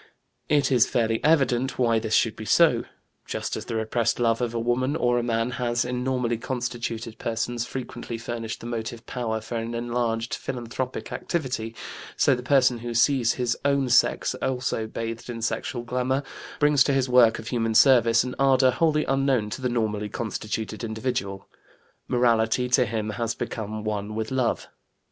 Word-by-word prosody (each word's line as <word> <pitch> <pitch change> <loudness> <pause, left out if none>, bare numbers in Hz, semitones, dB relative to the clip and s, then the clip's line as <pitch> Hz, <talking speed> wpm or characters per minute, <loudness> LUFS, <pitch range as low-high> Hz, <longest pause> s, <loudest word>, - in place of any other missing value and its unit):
It 145 -2 +3
is 125 -4 +5
fairly 115 -1 0
evident 135 -5 +2
why 115 -3 +3
this 110 0 0
should 115 -2 +2
be 110 - -7
so. - - +4 0.4
Just - - -3
as - - -6
the 115 - -4
repressed 110 +2 0
love 115 0 +2
of 120 -2 0
a - - 0
woman 125 +4 0
or 120 -5 +2
a - - 0
man 115 0 0
has, 120 0 +1
in 125 0 -2
normally 125 -3 0
constituted 115 -3 -4
persons, 115 +1 -2
frequently 120 -2 -6
furnished 115 0 -5
the - - -9
motive 115 0 -5
power 115 -3 -3
for 115 +2 -5
an 115 +1 -4
enlarged 115 -1 -1
philanthropic 125 +1 -4
activity, 125 -9 -3 0.4
so 140 - +4
the 125 - -2
person 130 -2 +3
who 120 0 -5
sees 120 -1 +3
his 125 -2 -1
own 140 -2 +2
sex 120 - +3
also 125 -4 -1
bathed 115 +1 -5
in 115 -1 -5
sexual 125 +1 -2
glamour, 125 +3 -1 0.3
brings 145 -2 +4
to 140 - +2
his 135 -1 +1
work 125 -3 +5
of 110 - -7
human 115 -3 -1
service 115 -2 +6
an 125 0 -5
ardor 135 -1 +5
wholly 150 +3 +1
unknown 135 -6 +1
to 135 - -5
the 125 - 0
normally 105 -3 -1
constituted 110 0 -4
individual; 110 -4 -3 0.6
morality 120 0 +2
to 125 -1 +3
him 110 -1 -2
has 115 +2 -2
become 110 -1 -5
one 105 0 -3
with 110 +1 -3
love. 130 -3 0
120 Hz, 170 wpm, -25 LUFS, 115-130 Hz, 0.6 s, service